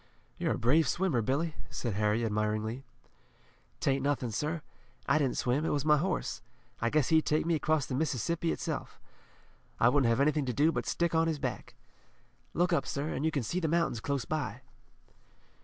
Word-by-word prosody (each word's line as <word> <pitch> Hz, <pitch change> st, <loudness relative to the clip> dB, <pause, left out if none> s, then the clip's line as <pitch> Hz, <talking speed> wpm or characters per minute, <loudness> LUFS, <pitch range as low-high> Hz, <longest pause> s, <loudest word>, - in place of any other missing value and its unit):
"You're -, -, +1 dB
a -, -, -4 dB
brave 145 Hz, +6 st, +3 dB
swimmer, 170 Hz, -6 st, +1 dB
Billy," 145 Hz, +8 st, 0 dB, 0.2 s
said 120 Hz, -4 st, -3 dB
Harry 105 Hz, +3 st, +1 dB
admiringly. 110 Hz, +3 st, -1 dB, 1.0 s
"'Tain't 135 Hz, 0 st, +1 dB
nothin, 135 Hz, -4 st, 0 dB
sir. 150 Hz, +7 st, -2 dB, 0.4 s
I 150 Hz, -, +3 dB
didn't 135 Hz, -4 st, 0 dB
swim. 130 Hz, +5 st, +1 dB
It -, -, 0 dB
was 145 Hz, 0 st, 0 dB
my 150 Hz, -1 st, +5 dB
horse. 180 Hz, +6 st, -2 dB, 0.4 s
I 115 Hz, -, +2 dB
guess 150 Hz, +1 st, +2 dB
he'd 160 Hz, -1 st, +4 dB
take 155 Hz, +1 st, +2 dB
me 170 Hz, -, +1 dB
across 155 Hz, -2 st, +1 dB
the -, -, -5 dB
Mississippi 160 Hz, +4 st, 0 dB
itself. -, -, -4 dB, 0.8 s
I 115 Hz, -, +6 dB
wouldn't 130 Hz, -2 st, +3 dB
have 115 Hz, -, +2 dB
anything 145 Hz, -1 st, +2 dB
to 125 Hz, -, 0 dB
do 150 Hz, +6 st, +3 dB
but -, -, -3 dB
stick 170 Hz, -1 st, 0 dB
on 165 Hz, 0 st, +3 dB
his 160 Hz, -2 st, 0 dB
back. 125 Hz, -8 st, -5 dB, 0.8 s
Look 175 Hz, +1 st, +2 dB
up, 155 Hz, -, +1 dB
sir, 145 Hz, +3 st, -2 dB
an' -, -, -3 dB
you 160 Hz, -, +3 dB
can 145 Hz, -5 st, -1 dB
see 175 Hz, +11 st, -1 dB
the 165 Hz, -, 0 dB
mountains 165 Hz, -7 st, +1 dB
close 140 Hz, +3 st, -2 dB
by." 135 Hz, -7 st, -3 dB
145 Hz, 190 wpm, -31 LUFS, 120-160 Hz, 1.0 s, I